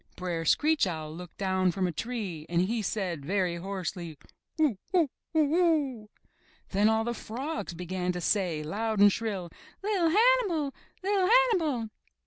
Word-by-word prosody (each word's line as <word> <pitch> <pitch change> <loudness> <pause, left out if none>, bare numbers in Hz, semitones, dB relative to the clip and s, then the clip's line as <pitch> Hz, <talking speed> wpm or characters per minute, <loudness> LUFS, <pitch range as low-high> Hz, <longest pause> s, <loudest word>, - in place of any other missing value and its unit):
Br'er 175 -3 -3
Screech 300 - +3
Owl 155 -3 -4
looked 180 0 -10
down 190 -1 +1
from 185 +1 -1
a 180 - 0
tree 190 -6 -4
and 170 +1 +2
he 225 +4 -1
said 180 -7 -2
very 180 +1 0
hoarsely: 180 -3 -5 0.4
"Who! 290 -11 +2
Who! 330 -7 +3 0.2
Who 315 - +4
oo!" 295 -8 +1 0.6
Then 205 +2 +3
all 220 0 +2
the 235 +1 -2
frogs 250 - -5
began 180 +1 -2
to 180 - -4
say, 175 -4 0
loud 215 +6 -2
and 205 0 +8
shrill, 200 -7 -3 0.3
*'Li'r 390 -5 +2
Hannibal! 400 - +3 0.3
UT 390 -1 +2
Hannibal!" 340 - +3
210 Hz, 150 wpm, -29 LUFS, -, 0.6 s, and